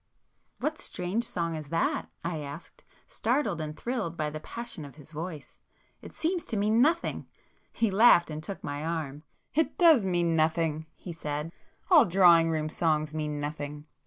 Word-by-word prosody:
"What 310 +1 -2
strange 185 +6 -2
song 170 -5 -2
is 155 -2 -7
that?" 165 +1 0
I 170 -2 -2
asked, 145 +3 -9 0.2
startled 225 - 0
and 155 0 -5
thrilled 225 -9 -3
by 150 -1 -1
the 155 - -5
passion 235 0 -7
of 140 -2 -11
his 150 0 -15
voice—"It 160 -2 -10
seems 340 +2 -1
to 225 - -3
mean 215 +3 +3
nothing!" 330 +5 +1 0.4
He 225 -3 0
laughed, 190 -5 +6
and 155 0 -5
took 190 +5 -7
my 145 +1 -4
arm. 155 -3 -3 0.3
"It 320 +2 +1
does 325 - +6
mean 175 -3 +1
nothing!" 160 0 +1
he 175 - -8
said—"All 165 - +1
drawing 170 -3 +6
room 155 -1 -1
songs 155 -1 0
mean 150 -1 -3
nothing. 145 0 -5
165 Hz, 160 wpm, -28 LUFS, 155-205 Hz, 0.4 s, laughed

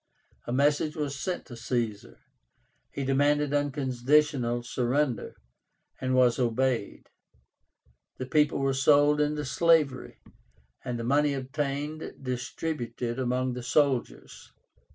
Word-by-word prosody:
A - - -3
message 145 +3 +2
was 145 -2 -3
sent 180 -1 -3
to 120 - -10
Caesar. 115 -3 -3 0.7
He 140 - -4
demanded 145 +2 +2
unconditional 135 -2 +1
surrender, 125 +2 -1 0.6
and 130 0 0
was 125 -1 +4
obeyed. 125 -2 -1 1.1
The 130 - -4
people 150 +2 +2
were 135 -1 +1
sold 145 +2 +4
into 150 0 -1
slavery, 150 -2 +2 0.7
and 125 -1 -3
the 115 - -4
money 145 +3 +2
obtained 145 +3 -4
distributed 125 -2 -4
among 130 0 0
the 125 - -5
soldiers. 130 +1 -1
135 Hz, 110 wpm, -28 LUFS, 125-145 Hz, 1.1 s, was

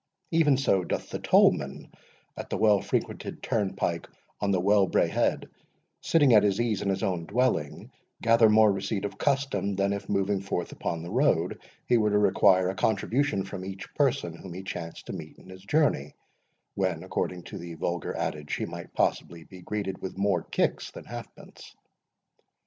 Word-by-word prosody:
Even 155 -5 +4
so 100 -9 +2
doth - - -4
the - - -3
tollman - - +2 0.4
at - - -7
the - - -2
well 105 -2 +4
frequented - - -3
turn 105 -4 -1
pike 85 -1 -2 0.3
on 100 - -1
the 95 -2 +2
Wellbraehead, 100 +1 +2 0.5
sitting 145 -6 +4
at 105 - +8
his 100 0 +1
ease 115 -4 0
in 100 - -1
his 95 - -1
own 90 -4 -1
dwelling, 120 - -1 0.3
gather 115 -1 +5
more 110 0 +6
receipt 100 +1 -2
of 100 - -6
custom, 135 -8 0
than 100 +1 +1
if, 100 0 -6
moving 100 0 0
forth 95 -3 -3
upon 85 -1 -4
the 85 - -7
road, 110 - +1 0.2
he 120 -1 +3
were 105 -1 +2
to 105 - +2
require 95 -2 +4
a 95 - -3
contribution 115 0 0
from 95 -1 -7
each 95 0 -8
person 135 - 0
whom 85 0 -10
he 95 - -7
chanced 85 -3 -7
to - - -6
meet - - -8
in - - -16
his 95 0 -11
journey, 100 - +1 0.6
when, - - -1
according 90 -1 -3
to - - -8
the 85 -1 -8
vulgar 85 +1 -3
adage, 75 -1 -3
he - - -2
might - - -9
possibly 85 -1 -1
be 95 +1 -13
greeted 95 0 -4
with 95 - -6
more 100 -3 +1
kicks - - -1
than - - -11
halfpence. - - -11
100 Hz, 175 wpm, -27 LUFS, 90-110 Hz, 0.6 s, at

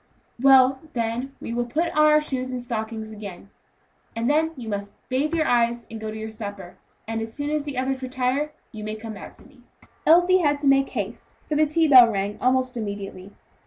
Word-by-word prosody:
"Well, 265 0 +6
then 240 +3 -3
we 230 - -6
will 240 0 -1
put 325 +7 -1
on 305 0 +5
the 305 - +6
shoes 260 -3 -3
and 255 - -3
stockings 220 -2 -5
again," 215 -1 -10
he 175 - -10
said 200 - -18
pleasantly, - - -40
"and 230 +1 0 0.2
then - - -9
you 240 -3 -7
must 200 -1 -4 0.2
bathe 285 +5 0
your 315 -1 +1
eyes, 235 -1 +1
and 225 - -6
go 220 - -4
to 215 - -6
your 220 0 -6
supper; 200 -4 -8 0.3
and, 225 0 -2
as 225 0 -6
soon 290 0 -3
as 300 -1 -1
the 285 -3 -5
others 260 +1 -1
retire, 260 +3 -1 0.2
you 215 -3 -8
may 215 0 -4
come 220 0 -7
back 200 - -10
to - - -17
me." 270 -3 -21 0.5
Elsie 355 +3 +6
had 290 -4 +2
to 285 0 -2
make 275 0 +4
haste, - - -6
for - - -2
the 305 +1 +3
tea 320 +2 +2
bell 255 -4 +9
rang 200 0 -3
almost 255 0 +1
immediately. 200 -3 -6
250 Hz, 225 wpm, -24 LUFS, 220-280 Hz, 0.5 s, bell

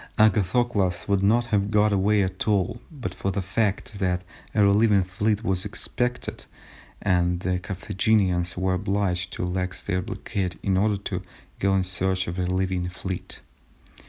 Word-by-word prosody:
Agathocles 105 -2 +2
would 100 -2 +2
not 115 +5 +3
have 100 0 +2
got 105 0 +3
away 100 +1 +3
at 95 +2 -3
all 105 +3 +1
but 140 -6 -5
for 95 - -2
the 95 0 -1
fact 100 +1 -1
that 90 -2 0 0.3
a 105 - +5
relieving 100 0 +4
fleet 105 +4 0
was 95 -4 0
expected, 125 0 -2 0.6
and 90 -2 +2
the 90 -1 0
Carthaginians 95 -1 0
were 95 0 +1
obliged 95 -2 0
to - - -3
relax 90 0 -2
their 90 -2 0
blockade 90 -2 -3
in 95 -2 +2
order 105 +2 +2
to 95 -2 -4 0.4
go 95 0 +2
in 95 - +2
search 95 +1 -1
of 85 - -4
the 90 - 0
relieving 90 0 0
fleet. 90 0 -6
95 Hz, 160 wpm, -25 LUFS, 90-105 Hz, 0.6 s, a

